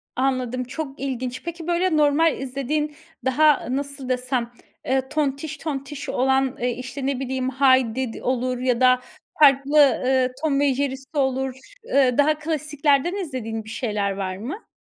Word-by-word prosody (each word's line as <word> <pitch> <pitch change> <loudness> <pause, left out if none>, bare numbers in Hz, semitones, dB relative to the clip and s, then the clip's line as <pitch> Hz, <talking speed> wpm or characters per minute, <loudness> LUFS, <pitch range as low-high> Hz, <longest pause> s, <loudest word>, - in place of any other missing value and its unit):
Anladım, 255 -1 0
çok 275 +2 -6
ilginç. 255 -2 -4
Peki, 340 0 -6
böyle, 345 -1 +1
normal 300 +2 +3
izlediğin, 275 +3 -2 0.3
daha, 295 +2 +3
nasıl 275 0 -4
desem? 250 -1 -1 0.3
Eee, 265 0 0
tontiş 295 0 -2
tontiş 285 -1 -5
olan, 265 0 +1
eee, 245 - +1
işte, 255 +3 -6
ne 270 -2 -1
bileyim, 260 -1 -2
Heidi 260 -2 +2
d - - -10
olur 255 0 0
ya 250 -1 0
da 255 0 +5 0.4
farklı, 280 0 +5
ııı, 260 -1 +4
Tom 280 -3 +2
ve 285 -2 +3
Jerry'si 270 +2 -3
olur. 265 -1 0
Ş 265 - -18 0.2
ııı, 260 -2 +4
daha 305 +1 +4
klasiklerden 305 0 0
izlediğin 255 - -4
bir 220 - -12
şeyler 210 -4 -1
var 190 -1 -4
mı? 275 - -7
265 Hz, 155 wpm, -23 LUFS, 255-290 Hz, 0.4 s, da